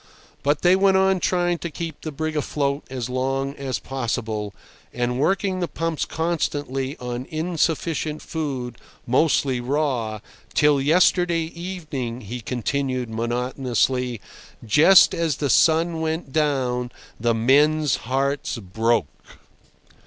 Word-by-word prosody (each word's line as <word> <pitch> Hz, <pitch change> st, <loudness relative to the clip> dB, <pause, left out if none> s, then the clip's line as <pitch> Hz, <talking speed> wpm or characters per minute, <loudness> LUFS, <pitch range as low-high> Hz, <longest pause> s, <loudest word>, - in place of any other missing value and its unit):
But 145 Hz, +1 st, 0 dB
they 180 Hz, +1 st, +6 dB
went 190 Hz, 0 st, +4 dB
on 190 Hz, 0 st, +3 dB
trying 175 Hz, -1 st, +1 dB
to 170 Hz, -, -4 dB
keep 165 Hz, -1 st, -6 dB
the 155 Hz, -, -5 dB
brig 155 Hz, +2 st, -3 dB
afloat 140 Hz, -1 st, -1 dB
as 125 Hz, -3 st, -4 dB
long 135 Hz, +2 st, -1 dB
as 135 Hz, -2 st, -3 dB
possible, 115 Hz, -5 st, -3 dB, 0.4 s
and 125 Hz, +1 st, -1 dB
working 190 Hz, +4 st, +1 dB
the 175 Hz, -, -1 dB
pumps 165 Hz, -2 st, -2 dB
constantly 145 Hz, -5 st, -2 dB
on 125 Hz, +1 st, -5 dB
insufficient 160 Hz, -1 st, -1 dB
food, 135 Hz, -7 st, -4 dB, 0.3 s
mostly 130 Hz, -1 st, +2 dB
raw, 125 Hz, -5 st, -1 dB, 0.4 s
till 150 Hz, -2 st, +4 dB
"yesterday 170 Hz, +3 st, +3 dB
evening," 155 Hz, -9 st, -5 dB
he 120 Hz, +4 st, -6 dB
continued 130 Hz, +1 st, -2 dB
monotonously, 125 Hz, +1 st, -1 dB, 0.5 s
"just 155 Hz, -, +6 dB
as 165 Hz, -4 st, 0 dB
the 145 Hz, -3 st, 0 dB
sun 165 Hz, 0 st, +3 dB
went 160 Hz, -3 st, -3 dB
down, 130 Hz, -5 st, 0 dB, 0.3 s
the 115 Hz, +1 st, +1 dB
men's 145 Hz, +4 st, +3 dB
hearts 135 Hz, +2 st, -1 dB
broke." 110 Hz, -2 st, -2 dB
140 Hz, 120 wpm, -23 LUFS, 125-160 Hz, 0.5 s, they